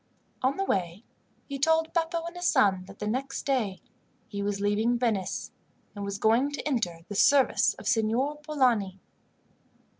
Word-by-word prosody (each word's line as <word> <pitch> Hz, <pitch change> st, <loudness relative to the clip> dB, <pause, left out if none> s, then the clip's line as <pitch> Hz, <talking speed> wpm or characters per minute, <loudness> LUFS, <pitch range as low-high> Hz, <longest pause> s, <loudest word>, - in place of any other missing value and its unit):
On 260 Hz, +2 st, +1 dB
the 390 Hz, -, 0 dB
way 185 Hz, -, -2 dB, 0.4 s
he 280 Hz, -1 st, -6 dB
told 320 Hz, +3 st, +2 dB
Beppo 335 Hz, 0 st, -1 dB
and 340 Hz, +1 st, -7 dB
his 355 Hz, 0 st, -1 dB
son 190 Hz, -2 st, +3 dB
that 195 Hz, +1 st, -13 dB
the 210 Hz, -, -5 dB
next 265 Hz, +5 st, -3 dB
day 240 Hz, -9 st, -1 dB, 0.5 s
he 200 Hz, -1 st, -5 dB
was 200 Hz, 0 st, -2 dB
leaving 210 Hz, +4 st, +1 dB
Venice, 220 Hz, -6 st, -1 dB, 0.4 s
and 205 Hz, -, -6 dB
was 200 Hz, 0 st, -3 dB
going 230 Hz, +7 st, +3 dB
to 290 Hz, -, -4 dB
enter 185 Hz, -, -1 dB
the 205 Hz, -, -6 dB
service 270 Hz, +6 st, +4 dB
of -, -, -12 dB
Signor 240 Hz, +7 st, +1 dB
Polani. 250 Hz, -11 st, +1 dB
235 Hz, 160 wpm, -28 LUFS, 200-280 Hz, 0.5 s, service